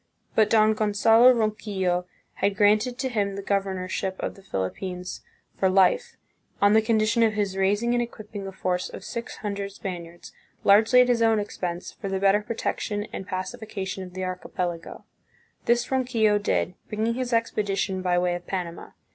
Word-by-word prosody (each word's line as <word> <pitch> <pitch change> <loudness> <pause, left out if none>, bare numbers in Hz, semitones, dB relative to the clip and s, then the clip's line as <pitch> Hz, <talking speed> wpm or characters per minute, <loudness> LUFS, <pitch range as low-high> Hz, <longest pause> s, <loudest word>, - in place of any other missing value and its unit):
But 220 -1 +4
Don 215 -1 +5
Gonzalo 220 +3 +5
Ronquillo 205 -6 0 0.3
had 200 0 +1
granted 215 +4 +3
to 260 - -1
him 200 -4 -1
the 200 - -5
governorship 190 -1 -1
of - - -3
the 195 - -16
Philippines 180 - -4 0.4
for 190 - +3
life, 195 - +3 0.4
on 205 +1 +5
the 220 - +6
condition 220 +1 +2
of 225 -1 +4
his 205 -3 -1
raising 205 +5 +1
and 240 - +2
equipping 210 -4 -7
a - - -5
force 185 -1 -2
of - - -9
six 235 -1 -6
hundred 200 -1 -3
Spaniards, 175 -3 -8 0.3
largely 220 +5 +6
at 250 - +4
his 240 -2 +2
own 225 -1 +4
expense, 180 -4 -4
for 200 - -7
the 195 0 -1
better 200 +1 +4
protection 210 -1 -3
and 190 - -6
pacification 195 0 -5
of 180 0 -11
the 185 - -3
archipelago. 180 -2 -4 0.6
This 240 +2 +2
Ronquillo 235 -5 +2
did, 205 -2 0 0.2
bringing 220 +2 0
his 250 0 -3
expedition 200 -4 0
by 180 -1 +1
way 175 0 +1
of 175 0 -6
Panama. 175 -3 -5
205 Hz, 165 wpm, -25 LUFS, 185-225 Hz, 0.6 s, the